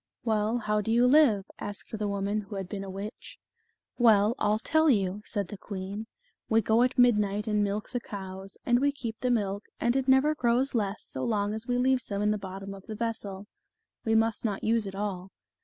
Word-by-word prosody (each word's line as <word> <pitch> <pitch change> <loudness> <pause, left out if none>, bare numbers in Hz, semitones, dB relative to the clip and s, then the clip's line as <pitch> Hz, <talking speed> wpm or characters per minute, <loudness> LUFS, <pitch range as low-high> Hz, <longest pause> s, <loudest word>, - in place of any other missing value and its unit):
" - - -61
Well, 220 0 +1
how 210 -2 0
do 225 - -2
you 240 +2 +4
live 250 -8 +5
?" - - -38
asked 205 +2 -8
the 210 - -1
woman 200 +1 -1
who 200 0 -9
had 195 -2 -4
been 195 0 -5
a 195 - -7
witch. 200 +4 -7 0.6
"Well, 220 -2 +5
I'll 210 +1 +2
tell 315 +6 +2
you," 200 -4 +1
said 200 -5 -3
the 205 - -8
queen. 200 +2 -6 0.4
"We 225 - +4
go 225 +3 +3
at 250 +1 +2
midnight 210 -4 +3
and 210 -1 +1
milk 205 +1 -2
the 245 - -1
cows, 195 -3 -8
and 240 0 +4
we 285 +2 +3
keep 235 -6 -6
the 250 - 0
milk, 205 -4 0
and 240 +1 +1
it 270 -1 0
never 265 +3 +5
grows 255 -1 +1
less 210 -3 -1
so 130 - -5
long 205 -2 0
as 220 +1 -5
we 245 0 +1
leave 260 0 +3
some 200 -3 -3
in 210 - +3
the 210 - -1
bottom 195 0 -7
of 195 -1 -12
the 215 - -5
vessel; 205 -3 -4 0.6
we 225 0 +1
must 225 0 +2
not 205 -4 -2
use 225 -1 +2
it 195 - -7
all. 195 -2 -4
210 Hz, 225 wpm, -28 LUFS, 200-235 Hz, 0.6 s, live